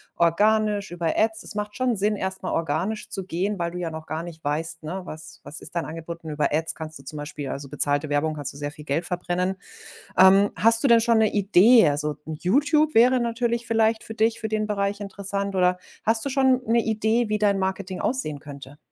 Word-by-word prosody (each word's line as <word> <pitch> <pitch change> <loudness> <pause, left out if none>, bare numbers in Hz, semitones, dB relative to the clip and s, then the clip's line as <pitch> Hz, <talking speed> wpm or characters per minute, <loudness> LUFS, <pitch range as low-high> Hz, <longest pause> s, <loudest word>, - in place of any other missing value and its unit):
organisch, 205 +4 +2
über 170 -2 -2
Ads? 220 0 +1
Es - - -7
macht 210 0 -4
schon 255 -2 +1
Sinn, 210 +1 +1
erst 190 0 -4
mal - - -2
organisch 165 +7 -2
zu 195 - -4
gehen, 190 +3 -2
weil 170 0 -1
du 175 - -7
ja 175 -2 -3
noch 160 0 -8
gar 160 +1 -4
nicht 165 -2 -10
weißt, 155 +3 -2
ne: 180 +5 -5
„Was 155 -1 -9
was 145 +3 -8
ist - - -10
dein 170 - -1
Angebot?“ 165 +1 -8
Über 150 -1 -1
Ads 160 +1 0
kannst 160 -1 -7
du - - -14
zum 150 - -6
Beispiel 145 -1 -6
also, 140 0 -6
bezahlte 145 +1 +1
Werbung, 145 +2 0
kannst 145 -2 -5
du - - -12
sehr 145 0 -4
viel 150 0 -13
Geld 155 +4 -1
verbrennen. 180 +1 -2 0.6
Ähm, 195 +2 +6
hast 230 +1 +5
du 275 - +3
denn 230 -1 +6
schon 230 -1 +3
'ne 220 -1 +3
Idee? 205 +1 +5
Also, 150 0 -2
YouTube 290 - +1
wäre 250 +3 +5
natürlich 235 0 -1
vielleicht 225 -1 +2
für 220 - -8
dich, 225 +1 +3
für 220 - -3
den 215 0 -1
Bereich 200 0 -1
interessant, 200 0 -3
oder 180 0 +2 0.3
hast 225 +2 +4
du - - -1
schon 260 -1 +3
'ne 230 +2 +3
Idee, 220 +1 0
wie 215 - +1
dein 205 -2 +2
Marketing 190 0 -3
aussehen 195 - -1
könnte? 140 -1 -11
190 Hz, 220 wpm, -24 LUFS, 160-220 Hz, 0.6 s, Ähm